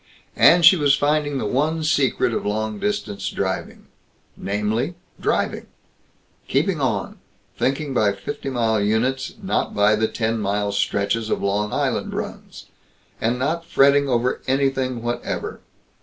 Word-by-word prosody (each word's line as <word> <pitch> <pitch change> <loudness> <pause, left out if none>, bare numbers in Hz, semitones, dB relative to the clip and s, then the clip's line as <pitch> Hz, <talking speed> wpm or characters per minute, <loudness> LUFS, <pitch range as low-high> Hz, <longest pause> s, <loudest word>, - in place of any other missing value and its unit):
And 170 -1 +6
she 180 +2 +8
was 145 -3 +4
finding 145 -1 0
the 130 - -2
one 155 +8 0
secret 145 -7 +1
of - - -2
long 110 0 -2
distance 205 - -2
driving 95 -1 -4 0.5
namely, 105 - -2 0.2
driving; - - -1 0.8
keeping 185 -7 0
on, 110 -8 -2 0.4
thinking 140 +1 -1
by 105 -5 +2
fifty 100 - -6
mile 115 -4 +1
units, 120 +6 0
not - - -1
by 105 +1 +4
the 110 +1 +1
ten 115 0 -1
mile 100 0 -1
stretches 100 +2 0
of - - -1
Long 105 +1 0
Island - - -1
runs; - - -7 0.6
and 120 +2 +1
not 155 +6 -1
fretting 140 -4 +3
over 125 0 0
anything 130 -2 0
whatever. 120 0 -3
120 Hz, 135 wpm, -22 LUFS, 105-140 Hz, 0.8 s, she